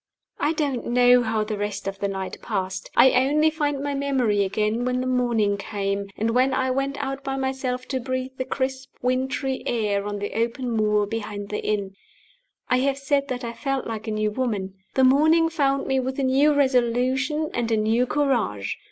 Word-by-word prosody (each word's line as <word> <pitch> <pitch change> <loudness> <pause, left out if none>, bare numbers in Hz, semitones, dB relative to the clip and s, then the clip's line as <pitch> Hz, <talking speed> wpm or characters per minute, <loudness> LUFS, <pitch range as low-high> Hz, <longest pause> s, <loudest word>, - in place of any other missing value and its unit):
I 300 - +1
don't 285 -6 -2
know 245 +1 +5
how 220 -2 0
the 215 -1 -4
rest 205 -1 -3
of 195 0 -4
the 200 - 0
night 190 -1 -5
passed. 190 0 -3
I 265 - +7
only 295 +5 +3
find 290 -3 -1
my 285 0 -1
memory 260 -7 +1
again 215 +4 0
when 250 0 0
the 255 - -2
morning 240 -5 +1
came, 200 -1 -3
and 225 +2 0
when 255 +3 +2
I 260 -1 +1
went 275 +2 -1
out 270 0 -4
by 270 -1 -2
myself 265 -1 -2
to 265 - -1
breathe 255 +1 -3
the 260 - -1
crisp 265 0 -3
wintry 260 +1 -1
air 205 -3 0
on 205 0 -3
the 205 0 -4
open 235 +2 -1
moor 210 -2 +2
behind 205 -1 -5
the 210 - -3
inn. 200 -2 -1 0.7
I 255 - +3
have 270 +1 +1
said 280 0 0
that 255 -1 -4
I 235 0 -4
felt 275 +2 -2
like 225 -1 -5
a - - -1
new 215 0 0
woman. 210 -6 -2 0.2
The 265 - +4
morning 315 +5 +5
found 275 -4 +1
me 265 0 +1
with 260 +1 -3
a 275 - 0
new 270 +3 +4
resolution 265 +3 +1
and 235 -1 -1
a 220 - +3
new 225 +4 +2
courage. 240 - 0
250 Hz, 195 wpm, -24 LUFS, 215-270 Hz, 0.7 s, I